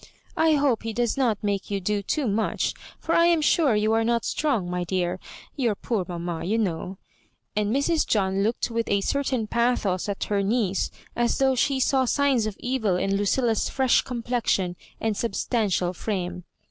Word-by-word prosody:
"I 320 -1 +4
hope 280 -6 +2
he 225 0 -4
does 240 +1 0
not 235 -7 0
make 200 -1 -1
you 200 -1 -1
do 205 +2 -1
too 280 +8 -1
much, 215 +1 0 0.3
for 330 - -2
I 335 0 +5
am 340 -1 +4
sure 295 -4 +3
you 215 +1 +2
are 225 0 +3
not 235 0 +1
strong, 260 -12 0
my 180 0 -2
dear. 180 0 -1 0.4
Your 240 -7 0
poor 205 -3 -2
mamma, 170 -2 -4
you 205 +6 0
know 185 -2 -2 0.3
" - - -47
and 210 -1 +1
Mrs. 290 +5 +1
John 195 -2 +1
looked 225 +3 0
with 230 0 -1
a 200 0 +2
certain 260 -1 0
pathos 215 -5 0
at 200 - -2
her 205 -1 0
niece; 200 -2 0 0.3
as 235 0 +1
though 265 -1 +3
she 265 +2 +1
saw 260 0 +2
signs 265 -4 +2
of 210 - -5
evil 245 -7 0
in 195 +2 0
Lucilla's 220 +3 +1
fresh 265 -2 +3
complexion 235 -7 -1 0.2
and 220 -2 -1
substantial 200 -4 0
frame. 180 -2 -4
220 Hz, 185 wpm, -25 LUFS, 195-250 Hz, 0.4 s, I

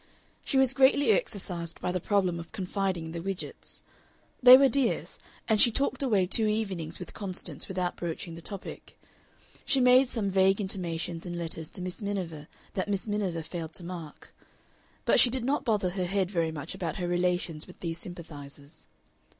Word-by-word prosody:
She 275 - 0
was 265 -1 +4
greatly 270 -1 +5
exercised 180 -5 -2
by 180 - -2
the 185 - -1
problem 185 -2 +1
of 170 - -9
confiding 190 -4 -2
in 160 - -7
the 170 0 -5
Widgetts; 195 +1 -6 0.6
they 250 0 +11
were 275 0 +6
dears, 265 -2 0 0.3
and 220 -2 +4
she 245 - +8
talked 275 +5 0
away 210 -9 +2
two 215 +4 +3
evenings 190 -7 -2
with 180 - -9
Constance 185 -6 -4
without 180 -1 -2
broaching 170 0 -4
the 165 - -9
topic; 195 +3 -8 0.6
she 275 - +2
made 250 +1 +6
some 205 -6 -1
vague 190 +1 +4
intimations 175 -3 -3
in 175 0 -4
letters 160 -2 -4
to 180 - -6
Miss 185 +4 -4
Miniver 180 -7 -4 0.3
that 190 +1 -2
Miss 200 +1 -1
Miniver 195 -6 -1
failed 165 -1 -6
to 180 - -4
mark. 170 -3 -9 0.7
But - - +5
she 245 - +8
did 250 -1 -2
not 275 +1 0
bother 210 -6 +1
her 185 -1 -2
head 190 0 0
very 165 -4 0
much 155 +1 -6
about 165 -4 -4
her 180 -2 -3
relations 175 -3 0
with 180 - -14
these 165 -1 -3
sympathizers. 150 -3 -10
185 Hz, 180 wpm, -28 LUFS, 170-210 Hz, 0.7 s, they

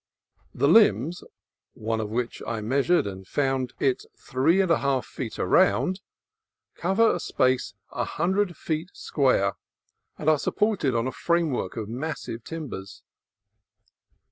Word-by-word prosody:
The 140 +3 +2
limbs 160 - +4 0.5
(one 110 0 -2
of 105 - -4
which 120 +2 -3
I 115 - -2
measured 140 +10 +2
and 95 -1 -7
found 135 -1 0
it 130 -2 +1
three 135 +9 +2
and 190 -3 +2
a 165 - +4
half 135 -2 0
feet 120 -4 -6
around) 185 - +3 0.7
cover 195 +6 +2
a - - -2
space 130 0 0 0.2
a - - -2
hundred 185 +1 0
feet 160 +2 -3
square, 115 -9 +1 0.6
and 150 - -6
are 155 -2 +5
supported 200 - +1
on 115 +1 +1
a 130 - -1
frame 170 0 +1
work 125 - -3
of 110 -2 -3
massive 120 -2 -5
timbers. 140 - -7
140 Hz, 140 wpm, -26 LUFS, 115-170 Hz, 0.7 s, are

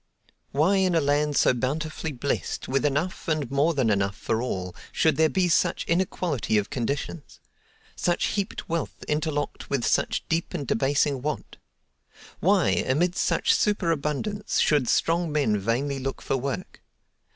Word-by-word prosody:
Why 165 +8 +3
in 185 -2 +2
a - - +5
land 145 0 +1
so - - +5
bountifully 155 +6 -2
blest, 140 +1 -3
with 135 +1 0
enough 150 +8 -2
and 155 -6 -1
more 150 +4 +2
than 125 -6 +2
enough 100 0 0
for 115 - -1
all, 90 -7 -3 0.2
should 160 - +2
there 160 0 +4
be 185 +1 +1
such 170 0 +1
inequality 170 - 0
of 105 - -1
conditions? 140 +4 -4 0.6
Such 175 0 0
heaped 200 -2 -3
wealth 165 -1 -3
interlocked 150 -1 -2
with 135 -4 0
such - - +1
deep 165 +2 -1
and 145 -5 -3
debasing 135 +2 +1
want? 150 +3 -4 0.8
Why, - - +3
amid 170 +7 +1
such 455 - +2
super 205 - +1
abundance, 165 +8 -1
should 145 -5 +3
strong 165 0 +1
men 135 -9 +1
vainly 130 +7 -1
look 135 +1 -4
for - - 0
work? 140 +7 -4
150 Hz, 150 wpm, -26 LUFS, 135-170 Hz, 0.8 s, a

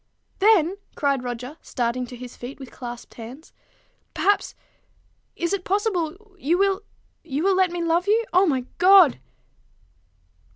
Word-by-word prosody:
"Then," 390 -3 +4 0.2
cried 280 -3 +1
Roger, 250 +5 -6
starting 245 +1 -2
to 245 - -9
his 245 0 -10
feet 250 +4 -9
with 265 -2 -10
clasped 240 -1 -9
hands, 245 +7 -11 0.3
" - - -42
perhaps 405 +1 +1 0.8
is 340 +2 -2
it 395 -2 -2
possible? 390 -1 -2
you 335 +3 +1
will 395 +1 +2 0.4
you 300 -1 -3
will 390 0 +3
let 375 -1 +3
me 345 0 -3
love 335 +3 +1
you? 450 +3 +3
O 370 +2 +5
my 260 -5 0
God!" 370 -5 +7
335 Hz, 150 wpm, -24 LUFS, 255-385 Hz, 0.8 s, God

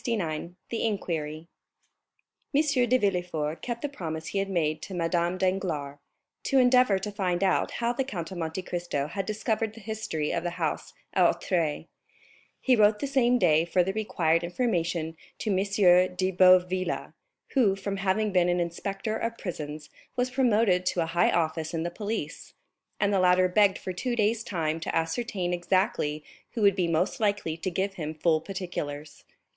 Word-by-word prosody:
The 175 - -2 0.3
Inquiry 160 -7 -3 1.1
M. 290 - +6 0.3
de 255 - +5
Villefort 175 -7 -1
kept 240 -1 -4
the - - +1
promise 160 - -5
he 200 - -1
had 195 0 -1
made 155 -4 0
to 190 +1 -7
Madame 170 +1 0
Danglars, 175 -7 -1 0.5
to 275 - +2
endeavor 250 -5 +5
to 205 +2 -4
find 185 -3 -1
out 190 -2 +1
how 235 0 0
the 270 - -1
Count 175 -10 -5
of 185 - -6
Monte 165 +3 -3
Cristo 175 -6 -2
had 190 +5 -4
discovered 220 0 -1
the - - -10
history 210 -8 -3
of - - -1
the 175 -1 -4
house - - -2 0.2
at - - +4
Auteuil. 165 -5 -1 0.7
He 255 - +3
wrote 210 -1 +4
the 245 - -3
same 255 -3 +3
day 160 -8 +4
for 175 +1 +2
the 190 +2 -2
required 170 -6 +1
information 170 -5 -1 0.2
to 215 - -2
M. 190 - +2 0.6
de 185 +1 0
Boville, 185 0 +3 0.4
who, 225 -8 +3
from 195 0 -4
having 195 +2 0
been 180 -2 +3
an 175 0 +1
inspector 195 +5 -3
of 230 +1 -3
prisons, 150 -4 -6 0.2
was 250 0 0
promoted 225 -8 +3
to 175 - +1
a - - +1
high 175 - +4
office 160 0 -1
in 160 - -1
the 175 - -3
police; 205 -5 -5 0.4
and 205 0 +2
the 195 - +3
latter 185 0 +4
begged 200 +1 +3
for 185 - -5
two 240 +7 -2
days 220 0 +1
time 165 -5 -2
to 160 - -3
ascertain 180 +1 -1
exactly 175 -4 0 0.3
who 225 - -1
would 200 -2 +5
be 180 -3 +1
most 165 +2 0
likely 205 -7 0
to 170 +3 -3
give 190 +3 -1
him 155 -4 -5
full 155 0 +2
particulars. 155 -6 -6
185 Hz, 175 wpm, -27 LUFS, 165-210 Hz, 1.1 s, M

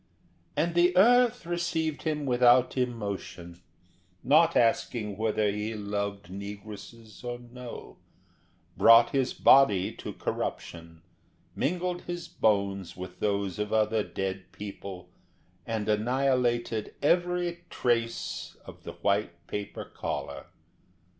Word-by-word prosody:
And 165 +3 +1
the 175 +1 +3
earth 245 +1 +5
received 170 -3 -1
him 150 -2 -2
without 125 -1 +4
emotion, 100 -8 -4 0.6
not 160 +4 +4
asking 115 -2 +1
whether 110 -1 +1
he 105 +2 -3
loved 100 -1 -3
negresses 105 +3 -9
or 120 0 -4
no, 120 0 -10 0.8
brought 115 +1 +7
his 135 -2 0
body 105 -9 +5
to - - -6
corruption, 85 -1 -5 0.5
mingled 180 +2 -1
his 175 -1 -5
bones 100 -4 0
with 90 0 -8
those 100 -2 -1
of 105 0 -2
other 110 0 +2
dead 95 -2 -4
people, 95 -3 -8 0.6
and 110 -2 -2
annihilated 120 0 0
every 175 +1 +1
trace 115 -1 -2
of - - -12
the - - -8
white 100 -4 -1
paper 105 +2 -5
collar. 70 -1 -5
115 Hz, 110 wpm, -28 LUFS, 100-140 Hz, 0.8 s, brought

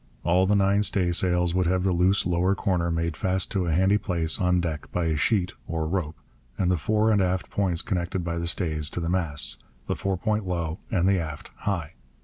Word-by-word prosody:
All 90 +2 +3
the 105 - +3
nine 100 +1 +3
staysails 90 -3 +1
would 90 -1 +1
have 90 +1 +1
the 95 - +2
loose 90 +3 +2
lower 90 +2 +2
corner 90 -4 0
made 85 -1 -1
fast 95 +1 0
to 95 -3 0
a - - 0
handy 95 +5 +3
place 85 -5 -1
on 90 -1 +3
deck 80 -4 -4
by 90 -1 -1
a 80 -1 +1
sheet 95 +3 +1
(or 80 -1 -2
rope) 80 -3 -2 0.4
and 90 -2 +1
the - - +3
fore 110 +6 +2
and 105 -2 +3
aft 95 0 -1
points 90 -5 0
connected 90 -1 -2
by 85 0 -2
the 85 - -3
stays 80 -4 -1
to - - -4
the 85 -1 -2
masts, 85 -6 -1 0.3
the - - -1
fore 95 -1 -1
point 105 +1 -1
low 85 -2 -2
and 95 -5 +1
the 95 -1 +3
aft 75 -3 -6
high. 85 -8 -3
90 Hz, 215 wpm, -26 LUFS, 85-95 Hz, 0.4 s, All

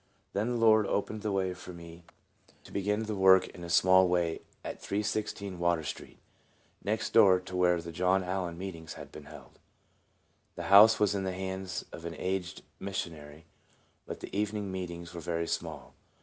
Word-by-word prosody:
Then 105 +4 0
the 120 - -1
Lord 110 -2 +5
opened 105 +1 -2
the 105 -1 -2
way 95 -1 0
for 90 0 -10
me 85 0 -12 0.4
to - - -26
64 - - -14
TRANSFORMED. - - -14
begin 105 +2 0
the 110 -1 -3
work 95 -1 +7
in 90 - -11
a 85 - -7
small 95 +2 +5
way 85 -2 0 0.2
at - - -6
316 100 -2 -3
Water 85 -2 +1
street, 70 - -7 0.7
next - - -2
door 95 -2 +7
to 90 0 -8
where 90 -1 +3
the 85 0 -7
John 90 +3 +2
Allen 90 -2 -3
meetings 85 -3 -7
had - - -10
been 75 - -11
held. 75 +1 -14 1.0
The - - -5
house 110 +3 +9
was 105 -2 +3
in 100 -1 -2
the 95 -1 -2
hands 95 0 -4
of 85 - -9
an 85 - -5
aged 95 0 -3 0.2
missionary, 80 -5 -6 0.6
but - - -7
the, - - -7
evening 105 -1 -1
meetings 85 -2 -6
were 85 - -6
very 85 +1 -2
small. - - -4
95 Hz, 185 wpm, -30 LUFS, 85-100 Hz, 1.0 s, house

